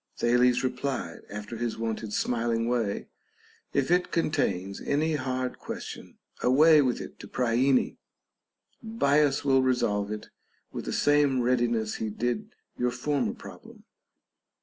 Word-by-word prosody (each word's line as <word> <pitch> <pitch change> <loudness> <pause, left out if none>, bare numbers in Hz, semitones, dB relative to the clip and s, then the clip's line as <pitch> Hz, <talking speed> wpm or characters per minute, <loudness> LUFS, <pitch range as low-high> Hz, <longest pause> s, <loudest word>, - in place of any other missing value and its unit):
Thales 125 +1 +3
replied, 130 +1 -3
after 105 +2 -6
his 120 0 -2
wonted 110 -1 -3
smiling 115 0 0
way, 115 -4 -1 0.7
If 140 +3 0
it 180 0 +2
contains 100 - -1
any 155 +3 0
hard 130 -3 -2
question, - - -8 0.2
away 150 +4 +6
with 130 -3 0
it - - -9
to - - -9
Priene. 125 +2 +1 0.8
Bias 145 -11 +2
will 135 -1 +4
resolve 105 -6 +1
it 105 - -6 0.4
with - - -6
the - - -3
same 145 -3 +3
readiness 120 -3 +1
he 110 - -3
did 115 +2 -2 0.3
your 125 - +2
former 145 +2 -1
problem. - - -13
125 Hz, 125 wpm, -27 LUFS, 115-140 Hz, 0.8 s, away